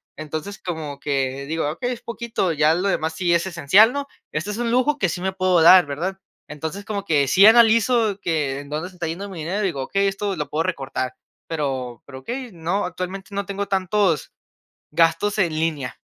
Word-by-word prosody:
Entonces, 155 +6 -6
como 160 -5 -5
que 135 -1 -1
digo: 160 0 -1
"Okey, 245 +10 -3
es 240 - -8
poquito, 235 -6 -2
ya 155 +1 +3
lo 180 +4 0
demás 160 -4 -1
sí 175 -1 +1
es 170 +1 +2
esencial, 185 - +5
¿no?, 280 0 -3 0.2
este 170 +7 -3
es 210 - -5
un 240 0 -1
lujo 255 +4 +2
que 195 - +1
sí 170 - -4
me 190 +1 -1
puedo 185 -2 +2
dar, 180 +2 +8
¿verdad?". 175 +7 -3 0.3
Entonces, 160 +6 -6
como 200 -2 -3
que 145 -6 +2
sí 190 +9 +6
analizo 225 -1 +5
que 150 -5 -1
en 140 - -13
dónde 155 +4 -3
se 185 - -18
está 175 -2 -4
yendo 175 +5 -5
mi 185 -4 -8
dinero, 175 +7 -2
y - - +1
digo: 145 -7 -3
"Okey, 195 +8 0
esto 195 0 -2
lo 150 - -4
puedo 155 +2 0
recortar", 135 -7 -3 0.3
pero 130 -6 -3
pero, 130 -2 -10
okey, 245 - -6
no, 175 +4 -1
actualmente, 185 +2 -6
no 200 0 -2
tengo 200 +1 -4
tantos 190 -3 +1 0.6
gastos 165 +6 +2
en 170 -5 +2
línea. 150 -6 -2
175 Hz, 205 wpm, -22 LUFS, 155-200 Hz, 0.6 s, dar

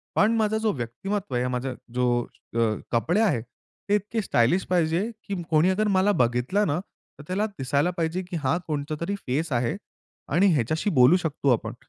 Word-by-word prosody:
पण 210 +2 +4
माझा 220 0 +1
जो 215 - +4
व्यक्तिमत्व 180 - -3
आहे, 125 +1 +1
माझा 130 +1 -2 0.2
जो 125 - +1 0.5
अ, - - +1 0.3
कपडे 165 - +2
आहेत, 145 - +2 0.5
ते 205 - +4
इतके 210 +2 -1
स्टायलिश 170 - +2
पाहिजे, 170 0 +2 0.2
की 195 -3 -4
कोणी 160 +3 +4
अगर 210 +3 +1
मला 200 +2 +4
बघितलं 125 - +1
ना, 150 +3 0 0.4
तर - - -9
त्याला 195 +4 0
दिसायला 140 +6 +1
पाहिजे 165 +3 -1
की 180 - -6
हा 160 +6 +2
कोणता 150 0 -2
तरी 200 +4 -1
फेस 150 +4 -1
आहे 120 -1 0 0.6
आणि 190 +4 +5
ह्याच्याशी 155 - 0
बोलू 125 +9 +7
शकतो 145 -3 -1
आपण. 110 0 -3
160 Hz, 175 wpm, -25 LUFS, 125-195 Hz, 0.6 s, बोलू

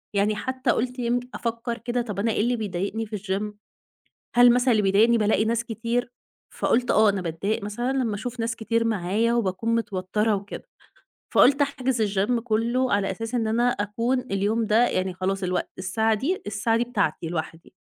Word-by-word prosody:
يعني 205 +1 +2
حتى 260 +3 -1
قُلت 250 +2 -2
يمك 240 +1 0
أفكر 235 0 -3
كده، 240 +1 -2
طب 210 -4 -5
أنا 225 +2 +1
إيه 210 - 0
اللي 245 +2 +1
بيضايِقني 205 +1 -3
في 210 0 -5
الgym؟ 205 +1 -3 0.8
هل 245 0 +8
مثلًا 250 +1 +3
اللي 215 -2 +3
بيضايِقني 215 +4 +4
بالاقي 215 0 +2
ناس 235 +1 0
كتير؟ 235 +2 -2 0.4
فقُلت: 245 +1 +1
"آه، 215 0 +5
أنا 195 -2 -2
باتضايَق 180 +6 -2
مثلًا 240 +6 -2
لمَّا 250 -5 0
أشوف 235 +4 -5
ناس 230 0 -2
كتير 230 +1 0
معايا 220 +3 +1
وباكون 225 +1 0
متوتِّرة 210 0 0
وكده." 200 - -7 0.7
فقُلت 280 +2 +6
أحجُز 265 -4 -1 0.2
الgym، 230 +5 +1
كله، 235 +2 0
على 200 -1 +1
أساس 225 +5 -5
إن 230 -2 +1
أنا 240 +2 +2
أكون، 230 +5 -1
اليوم 220 -1 -1
ده 230 +3 +4
يعني 185 0 -1
خلاص 190 +2 -2
الوقت 180 -1 -1
الساعة 220 +4 +1
دي 295 - -2
الساعة 210 +2 0
دي 240 - +1
بتاعتي 240 -8 -1
لوحدي. 165 0 -6
225 Hz, 180 wpm, -25 LUFS, 200-240 Hz, 0.8 s, هل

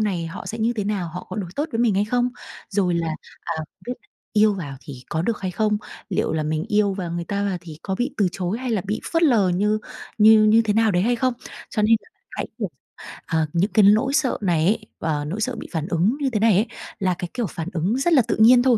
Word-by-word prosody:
này 185 -6 -1
họ 165 - -7
sẽ 225 - -5
như 230 +2 +1
thế 210 -4 -3
nào, 200 -4 -1
họ 180 +3 -7
có - - -6
đối 190 -5 -4
tốt 295 - +1
với 225 - -1
mình 235 -4 +3
hay 200 +2 +2
không? 245 +3 +1 0.4
Rồi 190 -4 +1
là, 170 -1 0 0.3
à, - - -4 0.3
cái 245 - -3 0.4
yêu 215 -1 +4
vào 145 -8 -6
thì 135 -4 -10
có 160 -1 -1
được 225 +4 -1
hay 185 - -2
không? 210 +2 +1 0.3
Liệu 185 - 0
là 160 -1 0
mình 155 +1 -1
yêu 210 -2 +2
và 185 -3 -4
người 170 0 -3
ta 200 +2 -2
và 195 -3 -1
thì 160 -3 -10
có 190 - -2
bị 245 +6 -1
từ 200 -4 +3
chối 185 +4 -2
hay 255 -1 -3
là 210 -5 0
bị 210 +2 -2
phớt 330 - +2
lờ 230 - +4
như 210 +4 +1 0.4
như 215 0 +7
như 220 +2 +5
thế 215 - +1
nào 225 -1 +4
đấy 180 -1 +2
hay 240 +4 +2
không? 255 +1 +1 0.4
Cho 215 - 0
nên 225 +2 +5 0.3
hãy, - - -4
kiểu, 210 -4 -2 0.6
ờ, 160 -1 +1
những 180 +5 +1
cái 215 - +5
nỗi 220 +7 +4
sợ 285 -4 +2
này 170 -5 +2
ấy, 215 +2 +1
và 150 -2 -1
nỗi 190 +9 -4
sợ 250 +3 -1
bị - - -7
phản 160 -1 -2
ứng 190 - +1
như 275 - +2
thế 225 -4 -1
này 220 0 +5
ấy 210 +5 +2 0.3
là 185 -2 +1
cái, 175 0 -5
kiểu, 240 -4 -1
phản 165 -1 -6
ứng 185 +8 0
rất 330 +6 +2
là 280 - +7
tự - - +1
nhiên 245 +3 +7
thôi, 250 -3 +4
210 Hz, 260 wpm, -23 LUFS, 175-225 Hz, 0.6 s, như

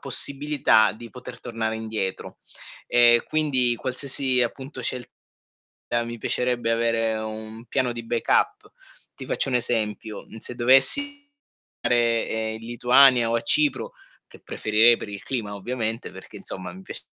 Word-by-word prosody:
possibilità 135 -4 +4
di 115 +1 -12
poter 125 -1 -10
tornare 115 -2 -3
indietro. 110 -4 -5 0.5
E 120 -1 +5
quindi 130 -6 +1
qualsiasi 130 0 -1
appunto 130 +3 -5
scelta 125 0 -5 0.9
mi 120 0 -7
piacerebbe 125 0 -1
avere 115 -1 0
un 110 +1 -7
piano 125 -2 -1
di 120 -1 -7
backup. 115 0 0 0.4
Ti - - -10
faccio - - -1
un 130 - +1
esempio, 110 -3 -1
mhmm, - - -13
se 120 - -5
dovessi 285 - +3 0.5
dare 115 -2 0
in 110 - -8
Lituania 125 0 +4
o - - 0
a 115 - +1
Cipro, 145 -3 0 0.4
che - - -16
preferirei 110 +2 +3
per - - -8
il 100 -1 -7
clima 110 -6 -4
ovviamente, 115 +2 -4
perché - - -12
insomma 90 -1 -4
mi 95 +2 -12
piac - - -8
120 Hz, 140 wpm, -24 LUFS, 110-130 Hz, 0.9 s, E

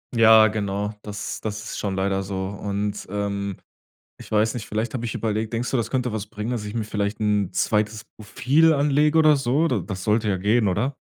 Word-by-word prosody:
Ja, 110 -1 +7
genau. 105 -1 -2
Das 105 0 -6
das 110 0 -4
ist 105 - -6
schon 100 -2 -2
leider 95 0 0
so. 95 0 -5
Und 100 +1 -4
ähm, 100 -1 -3 0.6
ich - - -12
weiß 110 +1 +2
nicht, 115 -3 -6
vielleicht, 110 +2 -2
hab 120 -2 -3
ich 115 - -3
überlegt 110 +1 -2
denkst 120 +1 -2
du, 130 - +1
das 115 - -1
könnte 125 -2 -1
was 105 -1 -4
bringen, 105 +2 -5
dass 115 -4 -3
ich 105 - -6
mir 115 - -1
vielleicht 105 0 -3
'n 105 -3 +1
zweites 105 0 0
Profil 140 +10 +2
anlege 150 +2 +2
oder 155 -1 +6
so? 135 +5 +1
D 125 - 0
das 95 -2 -5
sollte 110 0 +1
ja 95 - +1
gehen, 105 +3 +2
oder? 110 +9 -1
110 Hz, 210 wpm, -23 LUFS, 100-120 Hz, 0.6 s, Ja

